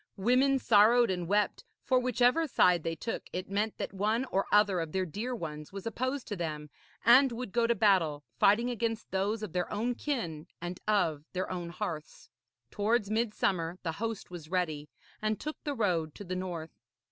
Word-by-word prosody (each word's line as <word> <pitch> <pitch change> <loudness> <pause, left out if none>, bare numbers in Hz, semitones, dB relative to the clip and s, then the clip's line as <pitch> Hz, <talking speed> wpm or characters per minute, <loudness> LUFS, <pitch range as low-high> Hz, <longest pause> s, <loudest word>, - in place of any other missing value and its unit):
Women 255 +7 +3
sorrowed 230 -1 +5
and 180 -2 -3
wept, 205 +1 +1 0.2
for 255 -1 +3
whichever 250 +5 +2
side 180 - +4
they 165 +1 -2
took, 225 - -5
it 185 +1 -5
meant 210 +2 -1
that - - -4
one 215 +6 0
or 195 - +1
other 205 -3 +4
of 165 -2 -4
their 190 -1 0
dear 220 +10 -4
ones 150 -7 -6
was 195 -1 -7
opposed 255 +4 -2
to 205 - -2
them, 155 -4 -4 0.3
and 255 +3 +7
would 235 -3 -5
go 235 +2 +2
to 235 - +2
battle, 180 -9 +3 0.2
fighting 230 +5 +4
against 230 -1 -3
those 205 +3 -1
of 205 - -6
their 180 -1 -1
own 235 +4 0
kin 200 - -3
and 175 +1 -5
of 165 -8 +1
their 185 0 -2
own 175 -2 -4
hearths. 170 -4 -6 0.4
Towards 210 0 +1
midsummer 195 -6 0
the 165 - -1
host 225 -5 -3
was 165 -3 -8
ready, 160 -5 -1 0.3
and 215 0 0
took 305 +1 -6
the 290 -1 -2
road 170 - 0
to - - -8
the 185 -1 -4
north. 175 -3 -4
205 Hz, 185 wpm, -30 LUFS, 175-230 Hz, 0.4 s, and